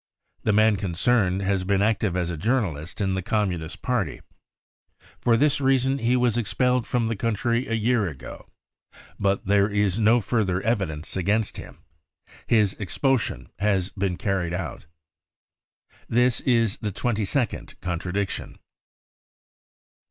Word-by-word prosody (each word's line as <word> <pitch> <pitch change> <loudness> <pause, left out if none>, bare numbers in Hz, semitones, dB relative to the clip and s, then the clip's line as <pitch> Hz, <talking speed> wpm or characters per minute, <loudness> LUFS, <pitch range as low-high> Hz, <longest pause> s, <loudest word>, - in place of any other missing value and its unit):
The 110 - +1
man 110 0 +4
concerned 95 +1 +1
has 95 -1 0
been 100 +1 +1
active 105 -4 +1
as 90 -1 -1
a - - -3
journalist 90 - -1
in 95 -1 +1
the 95 - -1
Communist 90 -5 -2
Party. 115 - -1 1.0
For 115 -1 +3
this 145 +2 +2
reason 135 0 +2
he 120 +1 +2
was 125 -2 +2
expelled 125 +2 +1
from 120 -2 0
the 115 - -1
country 115 +3 0
a 115 - 0
year 115 -2 +1
ago. 65 -4 -10 0.7
But 100 0 0
there 100 +1 +3
is 105 -1 +1
no 115 +2 +5
further 100 -5 0
evidence 95 -9 -2
against 100 +4 0
him. - - -11 0.6
His 105 -4 +3
expulsion 115 +5 -1
has 100 -2 +1
been 95 -4 -2
carried 90 -4 -1
out." 80 -5 -6 1.2
This 125 +1 +3
is 115 -5 +2
the 105 - -3
twenty 110 +2 -1
second 120 +5 -2
contradiction. 90 +3 -3
105 Hz, 135 wpm, -25 LUFS, 95-115 Hz, 1.2 s, no